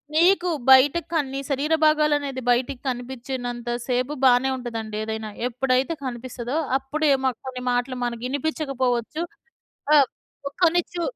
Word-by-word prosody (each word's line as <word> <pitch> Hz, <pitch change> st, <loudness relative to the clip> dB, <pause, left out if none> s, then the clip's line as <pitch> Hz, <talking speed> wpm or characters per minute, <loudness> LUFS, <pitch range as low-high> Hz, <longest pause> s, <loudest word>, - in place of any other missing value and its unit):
మీకు 355 Hz, +2 st, +4 dB, 0.2 s
బయటకి 285 Hz, +5 st, +6 dB
కని 295 Hz, -5 st, +1 dB
నీ -, -, -2 dB
శరీర 285 Hz, +3 st, 0 dB
భాగాలనేది 295 Hz, -3 st, +2 dB
బయటకి 245 Hz, +1 st, 0 dB
కనిపిచ్చనంత 245 Hz, -1 st, -5 dB, 0.2 s
సేపు 255 Hz, +3 st, 0 dB
బానే 255 Hz, +1 st, +5 dB
ఉంటదండి. 225 Hz, -3 st, -5 dB
ఏదైనా 220 Hz, 0 st, -4 dB, 0.2 s
ఎప్పుడైతే 255 Hz, +4 st, 0 dB
కనిపిస్తదో 245 Hz, +2 st, -4 dB, 0.2 s
అప్పుడే 290 Hz, +3 st, -1 dB
మాక్ 255 Hz, -3 st, 0 dB
కొన్ని 255 Hz, -1 st, -5 dB
మాటలు 245 Hz, +1 st, -1 dB
మనకినిపిచ్చకపోవచ్చు. 260 Hz, +1 st, -2 dB, 0.7 s
ఆహ్, 275 Hz, -3 st, +6 dB, 0.4 s
ప్ -, -, -1 dB
కొన్ని 350 Hz, +1 st, +5 dB
చు 345 Hz, -, -3 dB
260 Hz, 125 wpm, -24 LUFS, 245-295 Hz, 0.7 s, బయటకి